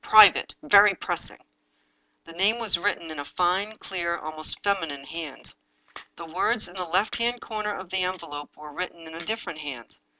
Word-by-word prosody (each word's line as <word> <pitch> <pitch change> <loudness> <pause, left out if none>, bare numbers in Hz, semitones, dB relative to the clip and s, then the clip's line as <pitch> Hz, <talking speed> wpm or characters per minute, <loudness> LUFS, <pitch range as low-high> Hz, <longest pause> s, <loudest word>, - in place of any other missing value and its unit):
Private! 215 -4 +7
VERY 200 +5 +7
PRESSING!!! - - -3 0.5
" - - -44
The - - -11
name 195 +7 +2
was 215 -7 +1
written 170 -4 -1
in 155 - -6
a - - -3
fine, 185 +8 0
clear, 170 -2 -2
almost 155 -1 -1
feminine 165 -9 -1
hand. 155 -2 -7 0.6
The 170 - -8
words 190 +7 0
in 175 - -14
the 185 -1 -3
left 185 +6 +1
hand 240 +1 0
corner 215 -3 -3
of 185 -2 -8
the 190 0 0
envelope 155 -5 -5
were 150 -1 -10
written 170 -1 -5
in 160 - -10
a 165 - -7
different 215 -3 -4
hand. 135 -6 -8
175 Hz, 185 wpm, -26 LUFS, 155-205 Hz, 0.6 s, Private